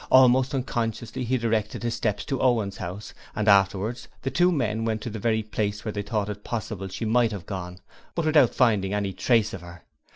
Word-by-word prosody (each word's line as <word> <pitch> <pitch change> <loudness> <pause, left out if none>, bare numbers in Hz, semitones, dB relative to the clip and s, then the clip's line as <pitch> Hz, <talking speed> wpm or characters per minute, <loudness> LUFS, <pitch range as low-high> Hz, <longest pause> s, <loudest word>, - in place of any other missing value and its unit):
Almost 130 +1 +5
unconsciously 115 -2 -2
he 130 +2 +1
directed 110 -1 -1
his 120 -1 -1
steps 110 -2 -1
to 135 -3 -2
Owen's 115 -6 +1
house, 90 +4 -6 0.2
and 105 0 -1
afterwards 100 +3 +3 0.2
the 135 - -1
two 180 +1 +4
men 115 -8 0
went 110 -1 -1
to 115 - -5
every 110 0 0
place 105 0 -3
where 110 - -1
they 105 - -3
thought 105 0 -2
it 105 0 -6
possible 105 -4 -4
she 95 +4 -5
might 115 +1 +3
have 100 -5 -6
gone, 90 -2 -6 0.4
but 170 - -1
without 150 -6 +4
finding 105 -6 +2
any 100 -2 -1
trace 115 -2 +2
of 95 - -6
her. 85 -1 -12
110 Hz, 200 wpm, -25 LUFS, 100-120 Hz, 0.4 s, Almost